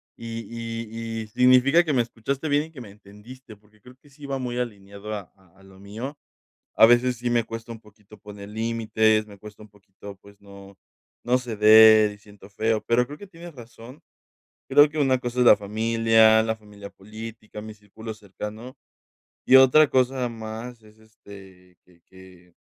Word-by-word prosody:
Y 115 0 -8
y 115 -1 -6
y - - -12
significa 130 +7 +4
que 155 -3 -2
me 125 -3 +2
escuchaste 130 +6 -5
bien 145 +1 +1
y 160 - -17
que 150 - -13
me 105 -4 -12
entendiste, 105 +4 -15
porque 105 +1 -29
creo 125 +3 -17
que 145 0 -24
sí 145 0 -12
va 135 -1 -3
muy 125 -1 -5
alineado 100 -2 -7
a 100 -3 -9
a 95 -1 -28
a 95 - -21
lo 95 0 -18
mío. 110 +9 -8 0.6
A 110 - +7
veces 120 +1 +2
sí 120 +1 -4
me 120 -1 +1
cuesta 115 +1 -9
un 115 - -11
poquito 105 -1 -20
poner 105 0 -12
límites, 110 -1 0
me 100 -1 -14
cuesta 105 +1 -14
un - - -17
poquito, 100 0 -14
pues 100 0 -19
no, 100 -1 -15 0.5
no 125 +1 +2
ceder, 110 -2 +5
y 105 - -15
siento 105 -1 -17
feo, 110 +1 -1
pero 120 +1 +2
creo 145 +4 -11
que 205 - -12
tienes 175 -2 -13
razón. 120 +2 -14 0.7
Creo 145 +1 +5
que 155 - -9
una 135 -3 +2
cosa 125 0 -5
es 125 - +3
la 110 - +7
familia, 110 +1 +2
la 110 0 -2
familia 105 -2 -13
política, 110 +1 -11
mi 110 0 -10
círculo 110 +2 -11
cercano, 105 +4 -10 0.7
y 130 - +7
otra 130 +3 +6
cosa 130 -1 0
más 115 +1 -9
es 110 0 -21
este, 95 -4 -17
que 85 -2 -27
que 95 -2 -19
110 Hz, 185 wpm, -23 LUFS, 105-125 Hz, 0.7 s, A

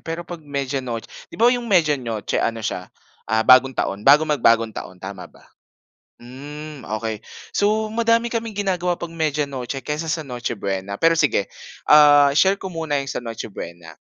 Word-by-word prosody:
pero 165 +1 -5
'pag 175 -1 -8
Media 140 -2 -3
Noch 115 -3 -5 0.2
'di - - -12
ba, 235 +2 +5
yung 245 -1 -3
Media 170 -7 +4
Noche 115 -4 -2
ano 115 -2 -2
siya, 90 - -4 0.4
ah, 110 +1 +1
Bagong 130 +2 +6
Taon 100 +1 -2
bago 145 +7 +6
mag 150 -3 -1
Bagong 115 -1 +3
Taon 95 - -8
tama 95 0 -8
ba? - - -21 0.7
Hmm 145 +4 -9 0.2
okey, 110 -1 -4 0.3
so 215 +2 +1
madami 230 +1 +1
kaming 225 -2 -3
ginagawa 180 -3 0
'pag 170 -1 -7
Media 150 -2 0
Noche 135 -1 -6
kaysa 155 +2 -3
sa 160 -1 -2
Noche 120 -3 -4
Buena 100 0 -3
pero 165 +6 +4
sige, 145 -10 +1 0.3
ah, 145 -1 +7
share 190 +6 +4
ko 190 -2 -7
muna 160 -3 -1
yung 140 - -2
sa - - -4
Noche 115 -2 -6
Buena. 85 -2 -9
145 Hz, 185 wpm, -21 LUFS, 115-165 Hz, 0.7 s, ah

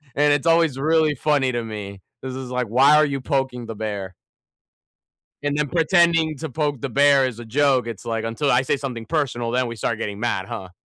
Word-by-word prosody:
And 145 +1 +4
it's 145 +3 -1
always 165 -4 +3
really 155 +1 +2
funny 140 -1 +1
to 120 -1 -2
me. 100 -3 -7 0.2
This 130 -1 -5
is 130 -1 -6
like, 125 0 -1
why 135 +7 +5
are 155 0 +5
you 140 -2 -3
poking 130 -4 -2
the 115 - -6
bear? 100 -3 -5 1.3
And 145 0 -1
then 150 -1 0
pretending 165 -1 +2
to 160 0 -5
poke 145 -2 -2
the 140 - -3
bear 140 0 +4
is 120 -2 -6
a 120 - -8
joke. 130 0 +2
It's 115 -2 -7
like, 115 -1 -3
until 115 +6 -1
I 125 +1 +4
say 135 - 0
something 125 -5 -6
personal, 120 -5 -1
then 125 +1 0
we 115 -1 -6
start 110 +2 -2
getting 105 -2 -5
mad, 110 -5 -1
huh? 95 -1 -7
130 Hz, 215 wpm, -22 LUFS, 115-145 Hz, 1.3 s, why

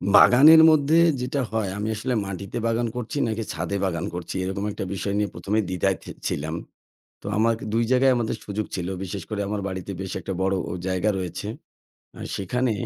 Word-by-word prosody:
বাগানের 155 +6 +9
মধ্যে 155 +1 +4 0.2
যেটা 130 +3 -1
হয়, 110 -3 -1
আমি 105 +1 -2
আসলে 125 +4 -2
মাটিতে 100 +2 -5
বাগান 115 +1 +1
করছি 125 +3 -4
নাকি 110 0 -2
ছাদে 90 +4 -2
বাগান 85 -3 -2
করছি 90 0 -5
এরকম 95 +2 -3
একটা - - -5
বিষয় 100 +1 -2
নিয়ে 105 -1 0
১ম 100 - -5
এই - - +1
দ্বিধায় 95 +1 +1
ছি - - -8 0.2
ছিলাম। 80 +3 -2 0.7
তো - - -18
আমার 115 +2 +3 0.2
২ 115 +1 +3
জায়গায় 130 +1 +5
আমাদের 115 -2 -1
সুযোগ 105 +1 -3
ছিল। 90 -2 -3 0.2
বিশেষ 95 0 -5
করে 105 -1 -2
আমার 105 0 -2
বাড়িতে 95 0 -5
বেশ 95 - -5
একটা 95 +2 -4
বড় 95 +1 +2 0.2
অ - - -3
জায়গা 95 +3 +1
রয়েছে। 90 +2 -5 0.7
আ - - -9 0.2
সেখানে 120 +6 0
100 Hz, 190 wpm, -24 LUFS, 95-115 Hz, 0.7 s, বাগানের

